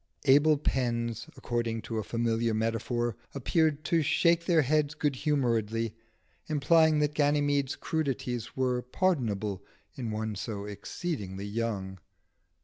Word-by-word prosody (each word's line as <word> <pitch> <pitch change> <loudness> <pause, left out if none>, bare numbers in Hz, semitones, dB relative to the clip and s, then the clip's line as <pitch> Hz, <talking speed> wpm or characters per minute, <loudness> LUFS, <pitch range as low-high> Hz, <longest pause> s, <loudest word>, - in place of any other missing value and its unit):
Able 145 +2 +6
pens 120 -5 -1
(according 115 -2 -2
to 115 -1 -3
a - - -2
familiar 115 0 0
metaphor) 115 +1 -1 0.2
appeared 155 +2 +1
to 165 +2 +2
shake 170 +2 +3
their 165 -4 +4
heads 150 +2 +1
good 150 -3 0
humouredly, 115 -6 0 0.5
implying 155 +1 +4
that 150 0 +1
Ganymede's 145 -2 +2
crudities 130 -7 -3
were 125 -1 +1
pardonable 110 - -1 0.3
in 120 -4 -5
one 110 0 -2
so 100 0 -5
exceedingly 100 - -5
young. 100 -3 -3
125 Hz, 120 wpm, -29 LUFS, 115-150 Hz, 0.5 s, Able